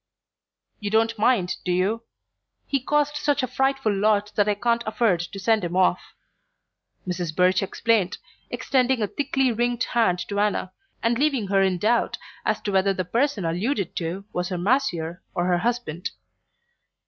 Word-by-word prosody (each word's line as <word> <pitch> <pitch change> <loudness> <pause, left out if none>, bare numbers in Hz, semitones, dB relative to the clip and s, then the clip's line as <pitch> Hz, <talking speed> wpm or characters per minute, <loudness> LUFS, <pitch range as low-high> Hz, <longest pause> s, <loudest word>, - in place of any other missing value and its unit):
"You 205 - -3
don't 225 +1 +1
mind, 210 -6 +2
do 180 - -1
you? 195 +6 +1 0.6
He 275 - 0
costs 295 +2 0
such 290 -2 +1
a - - 0
frightful 265 -3 0
lot 210 +1 +2
that 205 0 +2
I 205 - +2
can't 235 +3 +1
afford 215 -5 +2
to 180 +3 -6
send 215 +1 +2
him 175 0 -3
off," 185 -1 +1 0.9
Mrs. 175 -3 -3
Birch 185 +1 +3
explained, 200 0 +1 0.3
extending 255 -3 +1
a - - +1
thickly 270 0 0
ringed 240 +2 0
hand 225 -7 +2
to 200 0 -1
Anna, 200 -2 0 0.3
and 230 +1 +1
leaving 270 -9 +1
her 195 -1 +3
in 190 -2 +2
doubt 225 +6 +1 0.3
as - - +1
to 205 - -3
whether 195 0 +2
the 185 - -2
person 230 - 0
alluded 190 - -1
to 175 +4 -3
were 180 - -1
her 180 0 -3
masseur 180 -5 0
or 175 - 0
her 180 -1 +2
husband. 230 -7 -2
210 Hz, 165 wpm, -24 LUFS, 185-240 Hz, 0.9 s, Birch